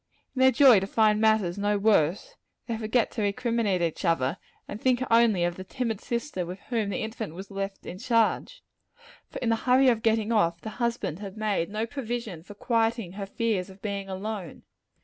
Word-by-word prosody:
In -, -, -3 dB
their 260 Hz, 0 st, +7 dB
joy 255 Hz, -4 st, +7 dB
to 195 Hz, -, -4 dB
find 215 Hz, 0 st, +3 dB
matters 215 Hz, -5 st, +2 dB
no 205 Hz, 0 st, +1 dB
worse, 200 Hz, -, +2 dB, 0.3 s
they 230 Hz, -, -3 dB
forget 220 Hz, +1 st, 0 dB
to 225 Hz, -, -4 dB
recriminate 210 Hz, -3 st, 0 dB
each 165 Hz, +2 st, -2 dB
other, 165 Hz, -3 st, +1 dB, 0.3 s
and 210 Hz, -, -7 dB
think 255 Hz, -1 st, +2 dB
only 230 Hz, -6 st, +4 dB
of 175 Hz, 0 st, -1 dB
the 185 Hz, -, -6 dB
timid 225 Hz, +1 st, -3 dB
sister 235 Hz, -5 st, -3 dB
with 180 Hz, +3 st, -7 dB
whom 225 Hz, -5 st, 0 dB
the 200 Hz, -, -2 dB
infant 220 Hz, -6 st, -5 dB
was 190 Hz, +3 st, -9 dB
left 195 Hz, 0 st, -5 dB
in 180 Hz, -, -7 dB
charge: 235 Hz, -, 0 dB, 0.7 s
for -, -, -8 dB
in 235 Hz, -, +1 dB
the 225 Hz, -, +3 dB
hurry 255 Hz, +3 st, +4 dB
of 230 Hz, -3 st, +1 dB
getting 220 Hz, 0 st, +1 dB
off, 170 Hz, -6 st, +2 dB
the 220 Hz, -, -6 dB
husband 235 Hz, -8 st, -1 dB
had 200 Hz, 0 st, -8 dB
made 210 Hz, -6 st, -1 dB
no 215 Hz, +2 st, -2 dB
provision 235 Hz, -, -5 dB
for 205 Hz, +5 st, -12 dB
quieting 225 Hz, -3 st, 0 dB
her 195 Hz, +1 st, -6 dB
fears 205 Hz, -3 st, -1 dB
of 190 Hz, +1 st, -14 dB
being 200 Hz, -2 st, -4 dB
alone. 195 Hz, -2 st, -5 dB
215 Hz, 195 wpm, -27 LUFS, 195-230 Hz, 0.7 s, their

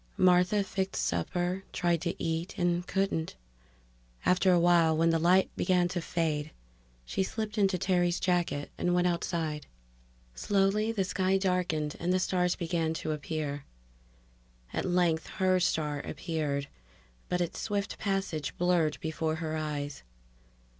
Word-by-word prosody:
Martha 185 Hz, +2 st, +4 dB
fixed 190 Hz, 0 st, -2 dB
supper, 175 Hz, -, -1 dB
tried 175 Hz, -2 st, +1 dB
to 170 Hz, -1 st, -2 dB
eat, 165 Hz, +2 st, -2 dB
and 175 Hz, 0 st, 0 dB
couldn't. 190 Hz, -4 st, -1 dB, 0.9 s
After 185 Hz, +1 st, +4 dB
a 175 Hz, -, +5 dB
while, 170 Hz, -2 st, +4 dB
when 165 Hz, +1 st, +3 dB
the 165 Hz, -, +2 dB
light 180 Hz, +3 st, +3 dB
began 180 Hz, -1 st, +2 dB
to 175 Hz, 0 st, -2 dB
fade, 155 Hz, -3 st, -1 dB, 0.6 s
she 190 Hz, -, -2 dB
slipped 215 Hz, +2 st, -3 dB
into 195 Hz, -3 st, +2 dB
Terry's 175 Hz, -1 st, +1 dB
jacket 175 Hz, -5 st, 0 dB
and 175 Hz, 0 st, +1 dB
went 180 Hz, 0 st, +2 dB
outside. 165 Hz, -3 st, -1 dB, 0.7 s
Slowly 200 Hz, -, +1 dB
the 210 Hz, -4 st, 0 dB
sky 185 Hz, +1 st, +1 dB
darkened 180 Hz, -6 st, 0 dB
and 175 Hz, +2 st, 0 dB
the 185 Hz, -, +3 dB
stars 180 Hz, -1 st, +1 dB
began 165 Hz, -2 st, -1 dB
to 155 Hz, -, -3 dB
appear. 150 Hz, -1 st, -3 dB, 1.1 s
At -, -, -1 dB
length 175 Hz, -3 st, +1 dB
her 185 Hz, -1 st, +3 dB
star 150 Hz, -4 st, 0 dB
appeared, 145 Hz, -2 st, -3 dB, 0.6 s
but 180 Hz, -, 0 dB
its 175 Hz, -1 st, -2 dB
swift 205 Hz, -2 st, -2 dB
passage 195 Hz, -9 st, -2 dB
blurred 175 Hz, -4 st, +2 dB
before 160 Hz, 0 st, -1 dB
her 160 Hz, -1 st, -3 dB
eyes. 145 Hz, -2 st, -3 dB
175 Hz, 140 wpm, -30 LUFS, 160-185 Hz, 1.1 s, a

